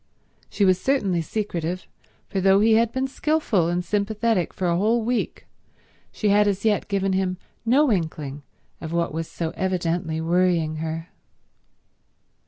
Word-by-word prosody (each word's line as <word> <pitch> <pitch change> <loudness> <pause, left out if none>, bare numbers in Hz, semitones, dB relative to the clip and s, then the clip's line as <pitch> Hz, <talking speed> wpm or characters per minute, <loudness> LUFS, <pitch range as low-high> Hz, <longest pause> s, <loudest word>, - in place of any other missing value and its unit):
She 205 - +1
was 185 -1 +3
certainly 200 -11 +1
secretive, 180 -2 -3 0.4
for 195 -2 -2
though 195 +1 +5
he 220 +2 +4
had 230 +1 +3
been 260 +1 -1
skilful 270 - +1
and 175 +1 -1
sympathetic 210 -1 0
for 185 - -4
a 170 - +2
whole 220 +5 +2
week, 245 +1 -2 0.7
she 210 - -1
had 205 +1 +4
as 200 +1 -1
yet 210 -2 +2
given 195 -2 0
him 185 -1 0 0.3
no 275 +3 +4
inkling 155 -6 -2 0.4
of 160 0 -5
what 170 -2 0
was 165 0 -3
so 165 -1 -3
evidently 175 -3 -1
worrying 165 -2 +1
her. 160 +1 -4
190 Hz, 150 wpm, -24 LUFS, 170-215 Hz, 0.7 s, though